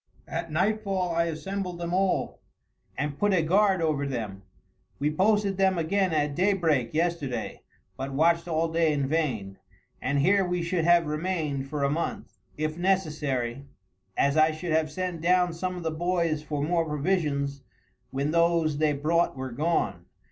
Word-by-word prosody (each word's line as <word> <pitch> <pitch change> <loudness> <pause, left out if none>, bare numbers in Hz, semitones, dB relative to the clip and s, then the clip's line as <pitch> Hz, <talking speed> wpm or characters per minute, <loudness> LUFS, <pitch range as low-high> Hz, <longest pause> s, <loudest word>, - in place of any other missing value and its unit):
At 165 -1 -4
nightfall 190 0 0
I 170 0 +2
assembled 180 +2 -4
them 170 0 -4
all, 190 0 0 0.6
and 145 0 -3
put 205 -2 +3
a 165 - +2
guard 190 +1 +3
over 145 -3 0
them. 110 -7 -4 0.6
We 150 +1 0
posted 200 +3 +2
them 190 -1 +3
again 185 +3 +1
at 150 -2 +1
daybreak 165 - +1
yesterday, 155 -9 -2 0.4
but 135 +1 -4
watched 170 +5 +2
all 165 0 +1
day 165 -1 +2
in 140 -2 0
vain, 125 -11 -1 0.4
and 140 +2 0
here 190 +8 +4
we 180 -1 -1
should 170 -1 0
have 170 -1 +5
remained 150 -3 -2
for 145 -1 -2
a 140 - +2
month 165 +3 -4 0.2
if 155 +2 -2
necessary, 150 -9 0 0.5
as 140 +2 +2
I 155 0 +6
should 160 +2 -4
have 155 0 +2
sent 180 0 -3
down 180 0 +3
some 180 +2 -3
of 175 - -6
the 160 - -1
boys 170 -1 0
for 150 -1 -3
more 165 +2 +1
provisions 150 -3 -1 0.5
when 140 +3 -1
those 170 -3 +2
they 155 -1 +3
brought 155 +2 +1
were 130 -1 -4
gone. 160 +7 -1
160 Hz, 160 wpm, -27 LUFS, 145-180 Hz, 0.6 s, I